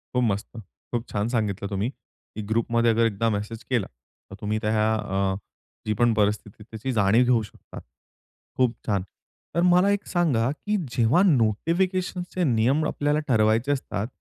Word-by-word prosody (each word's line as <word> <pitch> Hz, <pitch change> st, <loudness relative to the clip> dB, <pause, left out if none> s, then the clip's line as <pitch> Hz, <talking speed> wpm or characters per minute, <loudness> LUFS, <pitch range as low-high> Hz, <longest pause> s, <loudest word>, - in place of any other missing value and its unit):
खूप 125 Hz, -, +3 dB
मस्त. 100 Hz, -3 st, 0 dB, 0.4 s
खूप 120 Hz, -1 st, -2 dB
छान 105 Hz, +1 st, -1 dB
सांगितलं 105 Hz, -4 st, -1 dB
तुम्ही, 100 Hz, +4 st, -1 dB
की 110 Hz, -5 st, -13 dB
ग्रुप 115 Hz, +1 st, 0 dB
मध्ये 115 Hz, 0 st, +3 dB
जर 115 Hz, +1 st, +3 dB
एकदा 115 Hz, +1 st, 0 dB
मेसेज 105 Hz, +1 st, -4 dB
केला 120 Hz, -7 st, 0 dB, 0.4 s
तर 95 Hz, -, -9 dB
तुम्ही 105 Hz, 0 st, -1 dB
त्या 110 Hz, 0 st, +1 dB
अ, 95 Hz, -2 st, -1 dB, 0.5 s
जी 110 Hz, -, +2 dB
पण 120 Hz, +2 st, +2 dB
परिस्थिती 105 Hz, -1 st, 0 dB
आहे -, -, -11 dB
त्याची 115 Hz, +4 st, -4 dB
जाणीव 110 Hz, +1 st, +4 dB
घेऊ 120 Hz, -2 st, +3 dB
शकता. 105 Hz, -, -12 dB, 0.8 s
खूप 125 Hz, -2 st, +2 dB
छान 100 Hz, -3 st, +1 dB, 0.5 s
तर 170 Hz, -, +2 dB
मला 180 Hz, +2 st, +4 dB
एक 205 Hz, 0 st, -1 dB
सांगा, 140 Hz, -, +1 dB
की 210 Hz, +8 st, -2 dB, 0.2 s
जेव्हा 120 Hz, +9 st, +4 dB
नोटिफिकेशन 180 Hz, -, +1 dB
चे 185 Hz, -, +1 dB
नियम 130 Hz, +2 st, +2 dB
आपल्याला 145 Hz, +1 st, 0 dB
ठरवायचे 115 Hz, +2 st, +2 dB
असतात, 120 Hz, -6 st, -2 dB
115 Hz, 165 wpm, -25 LUFS, 105-140 Hz, 0.8 s, जाणीव